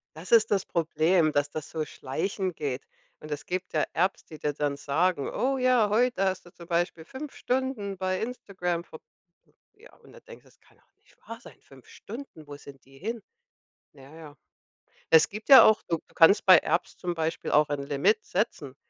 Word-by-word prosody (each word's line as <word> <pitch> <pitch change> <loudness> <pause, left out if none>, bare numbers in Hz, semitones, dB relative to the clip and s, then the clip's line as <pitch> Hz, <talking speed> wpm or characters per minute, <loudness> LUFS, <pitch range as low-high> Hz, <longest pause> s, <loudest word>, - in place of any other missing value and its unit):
Das 165 +6 -10
ist 225 -1 +5
das 195 -2 +1
Problem, 165 0 +1
dass 145 0 0
das 155 0 -6
so 155 -1 -3
schleichend 180 +7 -4
geht. 140 -3 -4 0.4
Und 155 - -11
es 145 - -5
gibt 185 0 -4
ja 155 - +1
Apps, 185 +3 0
die 155 - -12
dir 150 -1 -2
dann 145 -1 -2
sagen: 155 +1 0
„Oh 265 +1 -1
ja, 250 -4 +3
heute 225 -2 +1
hast 190 -1 -2
du 175 - -15
zum 170 -1 -14
Beispiel 170 -2 -1
5 270 - -9
Stunden 250 -7 -2
bei 185 0 -2
Instagram 185 -7 -4
verb“ 160 - -12 0.7
ja, 455 +4 -19
und - - -20
da - - -14
denkst 485 -1 -14
du: - - -23
„Das - - -28
kann - - -27
doch - - -34
nicht - - -28
wahr 230 0 -8
sein. - - -15
5 135 -2 -19
Stunden, 210 - -11
wo 145 - -9
sind 140 -2 -14
die 135 0 -19
hin?“ 225 +5 -5 0.7
Na 140 +1 -16
ja. 150 -3 -12 0.7
Es 160 -1 +6
gibt 215 +6 -9
ja 270 - +11
auch 220 0 +4
du 165 - 0
du - - -27
kannst 190 +5 +5
bei 185 -3 +9
Apps 170 +3 -2
zum 175 -1 -3
Beispiel 160 0 -3
auch 150 0 +3
ein 140 -1 -3
Limit 145 +10 +1
setzen, 145 - -3
175 Hz, 205 wpm, -27 LUFS, 150-210 Hz, 0.7 s, ja